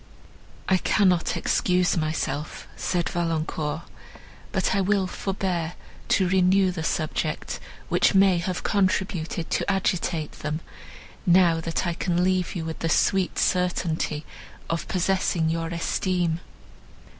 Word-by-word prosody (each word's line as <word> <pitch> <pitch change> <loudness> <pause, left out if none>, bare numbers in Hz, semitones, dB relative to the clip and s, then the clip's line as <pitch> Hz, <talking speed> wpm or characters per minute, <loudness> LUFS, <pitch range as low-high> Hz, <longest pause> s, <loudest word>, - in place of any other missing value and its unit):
"I 190 - +4
cannot 185 -2 +2
excuse 180 -1 +2
myself," 155 -2 -2
said 175 -2 -1
Valancourt, 160 -2 -2 0.7
"but 190 - +1
I 195 - +2
will 195 0 +2
forbear 185 -3 -2 0.3
to 190 - +3
renew 190 +1 +4
the 175 -2 -4
subject, 155 -1 -2 0.3
which - - +3
may 190 -2 +5
have 180 +1 -3
contributed 185 -4 0
to - - +1
agitate 180 -5 0
them, 150 +1 -3 0.7
now 175 -2 +5
that 165 +2 -2
I 175 - 0
can 175 +1 0
leave 185 -1 +1
you 165 -2 -3
with 160 0 -5
the 165 - -1
sweet 190 +2 +2
certainty 170 -4 0 0.5
of 165 - -2
possessing 180 -3 +1
your 165 0 -1
esteem." 170 0 0
175 Hz, 120 wpm, -25 LUFS, 165-185 Hz, 0.7 s, may